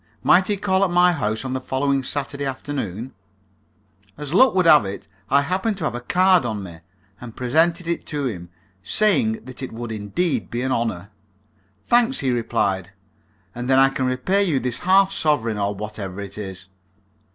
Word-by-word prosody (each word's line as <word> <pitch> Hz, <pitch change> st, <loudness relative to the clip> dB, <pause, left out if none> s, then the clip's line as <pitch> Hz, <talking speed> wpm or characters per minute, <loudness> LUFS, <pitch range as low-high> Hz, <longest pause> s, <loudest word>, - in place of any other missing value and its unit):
Might 185 Hz, +2 st, +5 dB
he 205 Hz, -, 0 dB
call 190 Hz, -1 st, +1 dB
at 195 Hz, -, +2 dB
my 180 Hz, +1 st, +4 dB
house 110 Hz, -7 st, -2 dB
on 130 Hz, -, -3 dB
the 130 Hz, -, -3 dB
following 135 Hz, +1 st, 0 dB
Saturday 140 Hz, +1 st, -4 dB
afternoon? 130 Hz, -4 st, -5 dB, 1.0 s
As 150 Hz, 0 st, -6 dB
luck 255 Hz, +3 st, +5 dB
would 185 Hz, -2 st, +3 dB
have 155 Hz, -6 st, +7 dB
it, 100 Hz, 0 st, -7 dB, 0.2 s
I 140 Hz, +1 st, +4 dB
happened 190 Hz, +7 st, -1 dB
to 175 Hz, -, -6 dB
have 150 Hz, -, -1 dB
a 120 Hz, -, -5 dB
card 185 Hz, +5 st, +3 dB
on 110 Hz, -4 st, -3 dB
me, 85 Hz, -3 st, -10 dB, 0.4 s
and 120 Hz, -2 st, -10 dB
presented 165 Hz, +7 st, +1 dB
it 170 Hz, -, -2 dB
to 145 Hz, -3 st, -3 dB
him, 90 Hz, -8 st, -5 dB, 0.3 s
saying 215 Hz, -, +1 dB
that 130 Hz, 0 st, -10 dB
it 130 Hz, -, -5 dB
would 115 Hz, 0 st, -6 dB
indeed 110 Hz, -, -2 dB
be 120 Hz, +1 st, -3 dB
an 130 Hz, -, -1 dB
honour. 105 Hz, -5 st, -2 dB, 0.7 s
"Thanks," 240 Hz, +2 st, +3 dB
he 130 Hz, -, 0 dB
replied, 100 Hz, -5 st, -1 dB, 0.6 s
"and 120 Hz, +1 st, -5 dB
then 130 Hz, -, +4 dB
I 135 Hz, 0 st, +6 dB
can 130 Hz, -1 st, -2 dB
repay 155 Hz, +11 st, +1 dB
you 160 Hz, -9 st, +1 dB
this 125 Hz, -2 st, -3 dB
half 195 Hz, +1 st, +4 dB
sovereign, 115 Hz, -, 0 dB
or 100 Hz, 0 st, -1 dB
whatever 100 Hz, -2 st, -6 dB
it 100 Hz, 0 st, -7 dB
is." 95 Hz, -3 st, -7 dB
130 Hz, 185 wpm, -22 LUFS, 110-175 Hz, 1.0 s, have